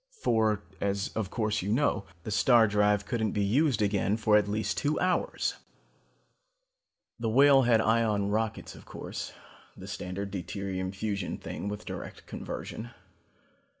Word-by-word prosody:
For, 110 -2 +2 0.2
as 100 0 0
of 110 -4 -3
course 105 -2 -1
you 100 +3 -2
know, 115 -6 +1 0.2
the 110 - -5
star 110 +3 +5
drive 105 0 +2
couldn't 110 -4 -1
be 105 - +1
used 120 +2 +2
again 100 +1 +1
for 110 -1 +3
at 105 -1 +4
least 105 +2 -1
two 150 +1 0
hours. 180 -1 0 1.6
"The 115 -1 -1
Whale 140 +4 +6
also 135 - +4
had 115 -2 +5
ion 110 -3 +2
rockets 110 +1 -2
of - - -13
course, - - -6 0.5
the - - -9
standard 95 +2 -5
deuterium 95 0 -3
fusion 100 -1 -3
thing - - -6
with 105 +1 -5
direct - - -7
conversion. 115 +2 -6
105 Hz, 150 wpm, -29 LUFS, 100-115 Hz, 1.6 s, Whale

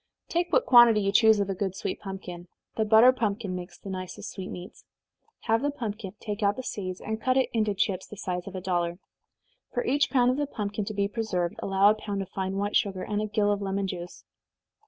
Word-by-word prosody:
_ - - -60
Take 345 +1 0
what - - +3
quantity 240 -3 +7
you 195 0 +1
choose 220 0 +5
of 200 - +1
a 195 - -1
good 190 0 -3
sweet - - -4
pumpkin, 185 -3 -8 0.3
(the 220 - +1
butter 220 +4 +7
pumpkin 210 -6 -2
makes 175 -1 -8
the 195 - -8
nicest 185 -1 -6
sweetmeats.) 185 -1 -8 0.6
Halve 225 0 +1
the 290 - +1
pumpkin, 215 -7 -5
take 210 0 -5
out 205 0 +2
the 260 - -6
seeds, 185 -6 -4
and 220 +1 -4
cut 255 0 +2
it 265 - +2
into 215 -3 +1
chips 190 -1 -1
of - - -26
the 210 - -10
size 180 -2 -4
of 195 - -7
a 185 - -4
dollar. 175 -2 -1 0.7
For 245 - -2
each 285 +3 +2
pound 250 -2 +4
of 255 - -2
the 290 -1 -1
pumpkin 205 -4 -3
to 215 - -5
be 200 0 +1
preserved, 200 -6 -2
allow 195 +1 +4
a - - +3
pound 205 -2 -4
of 190 - -13
fine 190 0 -3
white 205 +1 -1
sugar, 190 -2 +1
and 210 0 -2
a 215 - -2
gill 210 -1 +1
of 205 0 -1
lemon 195 0 -1
juice. 180 -2 -7
205 Hz, 235 wpm, -27 LUFS, 190-220 Hz, 0.7 s, quantity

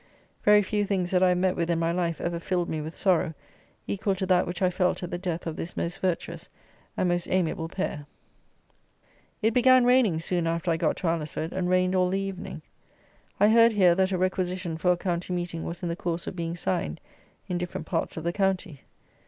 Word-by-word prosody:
Very 210 0 +6
few 205 +2 0
things 190 -3 -1
that 180 -1 +3
I 185 - +5
have 180 - +2
met 185 0 +1
with 170 0 -1
in 170 - +2
my 165 0 +1
life 170 -2 -1
ever 170 0 -2
filled 175 0 -1
me 155 -1 -3
with 155 +2 -7
sorrow 175 -4 +1 0.5
equal 195 0 -1
to 190 0 -2
that 185 -1 +3
which 175 +2 -3
I 180 - +3
felt 180 0 0
at 175 - -5
the 175 - -3
death 175 -2 -3
of 165 -2 -3
this 165 - -6
most 175 +3 -3
virtuous 180 -3 -3 0.5
and 185 - +1
most 175 0 0
amiable 165 -3 0
pair. 150 -6 -4 1.4
It 220 +1 +3
began 255 0 +5
raining 245 -9 +4
soon 170 +1 -1
after 170 +1 0
I 165 - +1
got - - +1
to 180 - -2
Alresford, 160 0 -2
and 185 -1 -1
rained 185 0 +2
all 185 -1 +3
the 190 +1 0
evening. 190 -5 -6 0.8
I 205 - +6
heard 230 +1 +6
here, 185 -4 +5
that 190 +2 +1
a 185 - +1
Requisition 185 -2 -1
for 180 +3 +2
a - - -4
County 175 0 -2
Meeting 175 -2 -3
was 170 +2 -5
in 175 - -1
the 170 - -2
course 175 -2 -3
of - - -5
being 170 -1 -3
signed 175 - -2 0.5
in 180 -1 -2
different 175 0 -5
parts 165 -1 -2
of 160 - -4
the 170 +1 -1
county. 190 -6 -1
180 Hz, 220 wpm, -27 LUFS, 170-190 Hz, 1.4 s, Very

